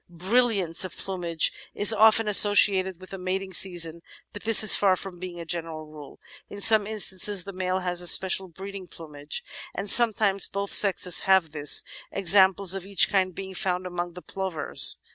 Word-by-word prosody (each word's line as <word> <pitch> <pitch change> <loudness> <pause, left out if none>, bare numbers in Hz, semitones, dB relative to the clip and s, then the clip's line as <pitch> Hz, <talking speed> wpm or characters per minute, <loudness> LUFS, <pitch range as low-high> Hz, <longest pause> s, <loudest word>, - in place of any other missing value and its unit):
Brilliance 190 0 0
of 185 - -9
plumage 175 -4 -2 0.2
is 205 +2 +2
often 220 0 +2
associated 195 -3 +4
with 185 - -14
the 195 - -9
mating 190 +1 -6
season, 170 -3 0 0.3
but 205 - -10
this 225 -1 +7
is 215 - +8
far 195 -2 +1
from 185 -1 -11
being 180 -1 -10
a 170 - -9
general 165 -2 -7
rule. 150 -2 -15 0.3
In 205 - -11
some 215 0 +3
instances 205 -2 -1
the 200 - -11
male 185 0 -4
has 180 -1 -5
a 175 - -3
special 190 +1 +2
breeding 190 +2 -12
plumage, 150 -3 -9 0.3
and 195 0 -1
sometimes 215 -4 +3
both 200 0 -6
sexes 185 -3 +2
have 190 -5 +1
this, 150 -1 +2 0.3
examples 190 0 +2
of 195 -2 -3
each 195 0 +1
kind 185 -3 -2
being 190 -1 -10
found 185 -1 -4
among 175 -1 -7
the 180 - -13
Plovers. 190 -6 -1
190 Hz, 175 wpm, -23 LUFS, 175-200 Hz, 0.3 s, is